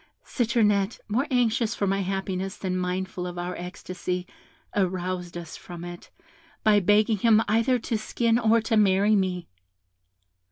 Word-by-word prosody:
Citronette, 220 -4 +1
more 250 +8 0
anxious 235 -2 +1
for 200 - -1
my 195 0 +1
happiness 190 0 -3
than 185 -2 -2
mindful 180 0 -2
of 175 0 -7
our 175 +1 -3
ecstasy, 180 0 -5 0.5
aroused 180 -2 -2
us 170 -2 -8
from 175 -1 -9
it, 175 0 -9 0.5
by 215 -2 +5
begging 210 +3 +3
him 220 +1 +4
either 230 +4 +3
to 225 -1 -2
skin 230 +1 +1
or 225 0 +4
to 225 +1 0
marry 205 0 +4
me. 185 -3 -1
195 Hz, 145 wpm, -26 LUFS, 180-220 Hz, 0.5 s, by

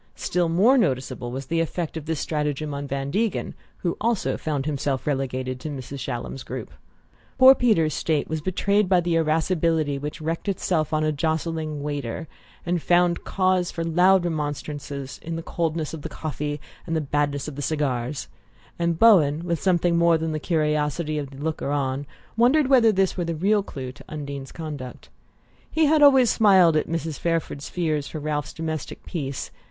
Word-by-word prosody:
Still 175 -2 0
more 220 +11 +5
noticeable 130 - -1
was 135 +2 -5
the 165 +5 -1
effect 165 0 -2
of 160 -2 -6
this 160 -2 -1
stratagem 150 -1 -2
on 140 0 -4
Van 135 0 -3
Degen, 220 +4 -1 0.3
who 170 -2 -1
also 230 -2 +1
found 145 -3 -2
himself 140 -3 -1
relegated 130 -2 -2
to 155 - -5
Mrs. 140 -1 -6
Shallum's 130 0 -5
group. - - -6 0.7
Poor 260 0 +9
Peter's 210 - +2
state 155 -1 0
was 160 0 -3
betrayed 200 +3 +1
by 185 -2 +5
the 175 0 0
irascibility 160 -2 +1
which 150 +3 -5
wreaked 165 +5 -3
itself 165 -5 0
on 155 0 +1
a 155 - +2
jostling 160 0 -2
waiter, 145 -1 -4 0.4
and 175 -1 0
found 175 0 +2
cause 185 -2 +1
for 165 - -4
loud 180 +3 +4
remonstrance 150 -2 -3 0.3
in 165 0 -5
the 165 - -5
coldness 165 -2 -2
of 160 - -6
the - - -6
coffee 150 -1 -4 0.3
and 165 - -1
the - - +2
badness 145 0 -1
of 150 - -6
the 145 - -5
cigars; 135 -2 -2 0.5
and 170 -1 +1
Bowen, 165 -8 +5
with 170 -2 -1
something 175 -2 +2
more 170 -1 +5
than 160 0 -2
the 155 - -2
curiosity 150 -1 0
of 140 -2 -5
the 135 - -12
looker 150 0 -3
on, 140 -1 -1 0.3
wondered 255 +6 +4
whether 250 -4 +5
this 195 -2 +1
were 175 - -1
the 165 0 -2
real 205 +6 +2
clue 130 -9 -7
to 140 - -15
Undine's 140 -3 -6
conduct. 145 -6 -7 0.6
He 320 0 +2
had 305 +1 +4
always 265 -4 +7
smiled 190 -6 +5
at 155 - +1
Mrs. 165 -2 -3
Fairford's 165 -4 -2
fears 155 -5 -1
for 155 - -6
Ralph's 150 0 -2
domestic 160 -2 -5
peace. 140 -5 -4
155 Hz, 180 wpm, -24 LUFS, 145-175 Hz, 0.7 s, Poor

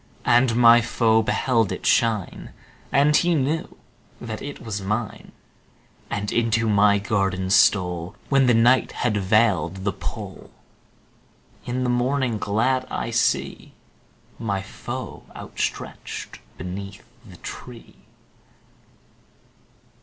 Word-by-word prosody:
And 120 -1 +4
my 120 0 +7
foe 115 -1 +2
beheld 115 -1 +1
it - - -5
shine. 110 -5 0 0.4
And 145 +2 +4
he 175 0 +3
knew 150 +3 -2 0.4
that 110 -2 -6
it 145 0 -7
was 105 -3 -5
mine, 105 +3 -4 0.8
And 105 0 -3
into 115 -1 +1
my 100 -1 +4
garden 95 -2 -1
stole 90 -4 +2
When 135 -2 +3
the 120 - +4
night 120 +3 +3
had 120 -4 -1
veiled 95 -3 +1
the 100 0 -1
pole; - - -7 1.2
In 125 +1 -2
the 125 - 0
morning 125 -2 0
glad 125 +6 0
I - - -3
see - - -1 0.7
My 100 -4 -2
foe - - -7
outstretched - - -5 0.2
beneath 95 +3 -7 0.2
the - - -14
tree. 120 -2 -10
115 Hz, 110 wpm, -23 LUFS, 100-125 Hz, 1.2 s, my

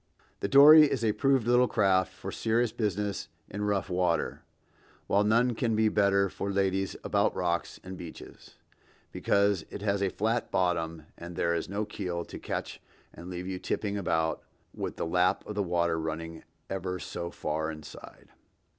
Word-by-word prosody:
The - - -1
dory 150 +4 +9
is 120 -4 0
a 110 - +3
proved 135 0 +2
little 125 +1 +5
craft 95 -4 +2
for 95 0 -7
serious 115 +2 +1
business 105 -2 -2 0.2
in 105 +1 -4
rough 100 -2 0
water, 90 -3 0 0.6
while 100 +1 +2
none 115 +4 +3
can 115 -1 0
be 110 0 +3
better 100 -1 +3
for 100 +1 -5
ladies 95 -1 0
about - - +1
rocks 85 -2 -2
and 95 0 -8
beaches; 85 -2 -11 0.6
because 100 -3 +1
it 100 - -7
has 100 -1 0
a 100 - +2
flat 110 +5 -1
bottom 85 -3 0 0.2
and 85 +1 -8
there 85 -1 +1
is 85 0 -2
no 105 +2 -2
keel 90 -5 -4
to - - -9
catch - - -5 0.3
and 85 - -10
leave 90 0 -5
you 95 -1 -4
tipping 100 +1 -2
about 80 -5 0 0.3
with - - -4
the - - -3
lap 90 +2 +1
of 105 - -5
the 105 - -1
water 85 -3 0
running 80 +1 -5 0.2
ever 90 -1 -3
so 85 -1 -5
far 80 -1 -3
inside. 75 -2 -11
95 Hz, 170 wpm, -29 LUFS, 85-105 Hz, 0.6 s, dory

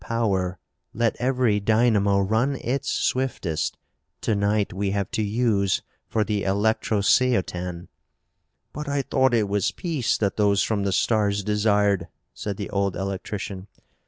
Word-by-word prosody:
"Power! 95 -6 0 0.4
Let 115 0 +1
every 125 -4 +2
dynamo 105 -2 +3
run 110 +8 +1
its 130 +1 -2
swiftest. 125 -11 -1 0.4
To 110 - 0
night 100 0 +1
we 100 +1 -1
have 100 -1 -2
to - - -1
use 105 -3 +1 0.3
for 110 - +1
the 105 -1 -1
electrosceotan!" 100 -3 +1 0.9
"But 150 0 -5
I 140 -1 0
thought 130 -2 +2
it 110 -3 +2
was 100 -2 +1
peace 150 -9 -1
that 100 -2 -1
those 100 -2 +3
from 100 -3 -1
the 100 - +1
stars 105 -1 +1
desired," 105 -3 +2 0.3
said 100 -2 -5
the 100 - -5
old 100 -2 0
electrician. 95 0 -5
105 Hz, 135 wpm, -24 LUFS, 100-115 Hz, 0.9 s, dynamo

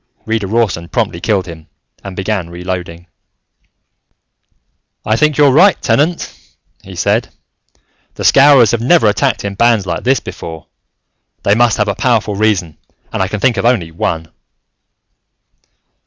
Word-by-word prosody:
Reader 110 -3 -2
Rawson 100 -6 -1
promptly 85 - -2
killed 100 -2 0
him 80 -3 -11 0.4
and 95 -2 -8
began 95 -3 -3
reloading. 85 -1 -6 2.0
"I 110 - +1
think 150 +4 +1
you're 145 -2 +5
right, 185 +8 +4
Tenant," 165 +4 0 0.5
he - - -12
said. - - 0 0.9
"The - - -6
Scowrers 135 -5 +5
have 120 - -1
never 160 +4 +3
attacked 105 -1 0
in 100 - -3
bands 115 -1 +2
like 85 -2 -4
this 130 0 +2
before. 80 -2 -9 0.8
They 100 - +3
must 120 +1 +2
have 105 - 0
a 100 - 0
powerful 110 -1 0
reason 100 -6 -1 0.3
and - - -2
I 95 - +1
can 105 +2 -4
think 120 +1 +1
of - - -1
only 100 -10 0
one." 80 -1 -3
105 Hz, 140 wpm, -14 LUFS, 90-120 Hz, 2.0 s, you're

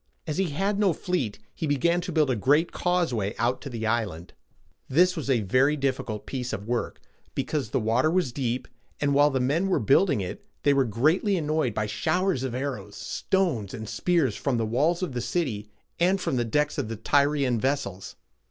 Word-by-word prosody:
As 155 +2 -3
he 190 -3 +1
had 195 +7 -1
no 200 -4 +3
fleet, 145 - -2 0.2
he 160 - -3
began 170 +5 +2
to 180 +1 -5
build 155 -4 +2
a - - +1
great 145 - +2
causeway 145 - 0
out 120 +2 0
to 140 - -6
the 115 -3 -4
island. 110 -7 -2 0.6
This 180 +7 +4
was 155 -5 -4
a 125 -4 +3
very 130 +9 +2
difficult 130 -6 -2
piece 125 -3 -4
of 100 -1 -4
work, 120 0 -2 0.4
because 145 -8 -2
the - - 0
water 115 +6 +2
was 175 -6 +1
deep; 125 -1 -2 0.3
and 145 -1 +1
while 145 +1 +5
his 130 -2 0
men 160 +9 +1
were 190 - +2
building 140 - +3
it, 95 -2 -5 0.2
they 145 - +4
were 135 -1 +3
greatly 155 - +2
annoyed 155 -7 0
by 105 - 0
showers 175 - 0
of 130 -2 -3
arrows, 125 -7 -4
stones, 155 - -1
and 110 -2 -7
spears 160 - +1
from 135 -4 -1
the 115 - 0
walls 155 - +1
of 165 -8 -3
the 120 - -2
city 115 -5 -2 0.3
and 185 +3 +3
from 160 - -1
the 120 -1 +1
decks 150 +5 0
of - - -2
the 115 - -4
Tyrian 140 0 +2
vessels. 105 -8 -2
135 Hz, 200 wpm, -26 LUFS, 115-165 Hz, 0.6 s, while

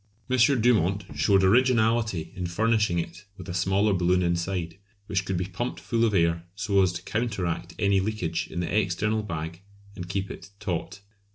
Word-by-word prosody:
M. 130 - +2 0.2
Dumont 100 -4 +3
showed 95 +6 +3
originality 110 -5 +2
in 90 -2 -3
furnishing 105 0 +1
it 85 +2 -5
with 90 - -10
a 90 - -4
smaller 95 +4 +2
balloon 90 0 +2
inside, 85 0 -2 0.3
which 100 -2 -1
could 95 -2 -1
be 90 - -1
pumped 100 +7 -4
full 115 -1 0
of 105 -3 +1
air 85 -1 +2
so 100 -2 +2
as 95 -2 +3
to 85 +1 -6
counteract 95 -6 -2
any 100 -2 +3
leakage 95 -5 -2
in 85 - -4
the 90 - -2
external 105 +2 +1
bag 85 -3 -5 0.3
and 90 -1 -7
keep 95 +1 -2
it - - -10
taut. 100 0 -4
95 Hz, 175 wpm, -26 LUFS, 85-105 Hz, 0.3 s, Dumont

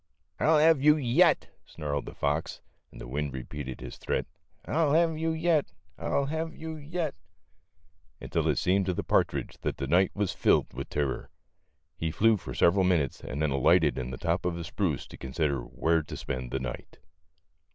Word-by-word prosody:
"I'll 155 +1 +4
have 155 -2 +5
you 150 +1 +6
yet," 145 +6 +3
snarled 70 -3 -4
the - - -8
fox, 75 +3 -1 0.3
and - - -13
the - - -8
wind 70 +2 -3
repeated 65 0 -6
his - - -8
threat, - - -1 0.4
M - - -4
I 160 - +2
'11 155 +3 +4
have 160 - -5
you 165 0 0
yet; 160 -2 +1 0.3
I'll 140 - 0
have 160 +3 -3
you 160 0 -6
yet," 155 +1 -3 1.1
until 80 -2 -1
it 75 -5 +2
seemed 95 +1 +2
to 90 - 0
the - - -2
partridge - - 0
that - - -2
the - - -3
night 90 +6 +4
was 105 -3 0
filled - - +2
vith 70 +2 -6
terror. 70 -2 -2 0.7
He 80 - -2
flew 110 +7 +4
for - - -8
several 95 +3 +4
minutes 85 -8 +1
and 70 +3 -3
then 75 - +1
alighted 75 +2 +3
in 65 -1 -4
the 65 - -6
top 85 +6 -1
of 90 -1 -1
a 85 - -4
spruce 80 - -2
to - - -12
consider 70 +1 -1
where 80 +7 0
to 75 - -8
spend 65 -1 -4
the 65 - -2
night. 65 -1 -7
85 Hz, 195 wpm, -28 LUFS, -, 1.1 s, you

